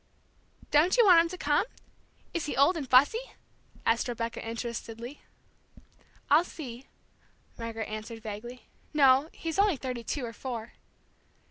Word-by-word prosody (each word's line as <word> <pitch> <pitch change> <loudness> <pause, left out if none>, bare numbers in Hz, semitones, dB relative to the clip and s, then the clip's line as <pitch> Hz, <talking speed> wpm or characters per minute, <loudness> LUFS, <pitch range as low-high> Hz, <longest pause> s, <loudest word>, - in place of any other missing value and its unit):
"Don't 310 +9 +4
you 475 - +7
want 355 -4 +8
him 335 - -1
to 365 - -6
come 295 +1 +2 0.7
is 335 -3 -2
he - - -3
old 280 +7 +5
and 285 -6 -5
fussy?" 290 - +4 0.5
asked 230 +2 +2
Rebecca, 230 -1 -4
interestedly. 230 +2 -6 1.1
"I'll 300 +4 +5
see," 265 -7 -9 0.7
Margaret 225 -2 -5
answered 215 +1 -7
vaguely. 225 +3 -7 0.3
"No, 275 +1 +5
he's 325 +2 -4
only 400 -6 +4
thirty 250 -2 -5
two 255 +3 -3
or 230 - -7
four." 235 -2 -6
255 Hz, 135 wpm, -29 LUFS, 230-310 Hz, 1.1 s, want